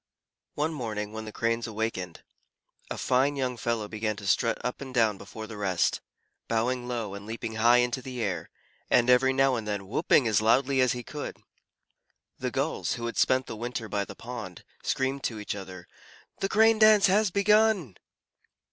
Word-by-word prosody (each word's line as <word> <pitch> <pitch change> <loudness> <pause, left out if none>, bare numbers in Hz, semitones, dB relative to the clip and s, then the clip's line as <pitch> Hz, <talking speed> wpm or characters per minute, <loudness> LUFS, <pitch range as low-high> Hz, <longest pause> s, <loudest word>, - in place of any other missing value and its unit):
One 155 +2 0
morning, 110 -6 -4
when 110 0 -6
the 110 - -7
Cranes 115 +2 -1
awakened, 110 -6 -4 0.7
a - - -4
fine 135 +3 +2
young 130 -2 -1
fellow 115 -2 -2
began 110 0 -2
to 105 -1 -9
strut 115 +3 +2
up 125 +2 -3
and 135 -1 -7
down 110 -5 +2
before 110 - -8
the 110 -1 -9
rest, 90 -6 0 0.5
bowing 120 +2 0
low, 115 -5 -3
and 100 +1 -8
leaping 110 0 -5
high 120 +2 +5
into 125 +2 -3
the 125 -1 -7
air, 95 -4 -3 0.4
and 125 +1 +4
every 130 +1 +5
now 135 0 +3
and 115 -3 -3
then 100 -2 -3
whooping 120 +4 +3
as 110 -2 +3
loudly 130 +4 +3
as 130 - +3
he 125 -1 -6
could. 145 +4 -6 1.0
The - - -2
Gulls, - - -1
who 115 - -5
had 115 - -4
spent 130 0 +3
the - - -7
winter 120 0 -4
by 100 -1 -1
the - - -10
pond, 115 -7 -8 0.2
screamed 135 +1 -1
to 110 - -2
each 105 - -4
other, 95 -3 -9 0.5
"The 195 - -1
Crane 220 +1 +4
dance 215 -2 +7
has 205 +2 +3
begun!" 200 - +3
120 Hz, 185 wpm, -28 LUFS, 105-130 Hz, 1.0 s, dance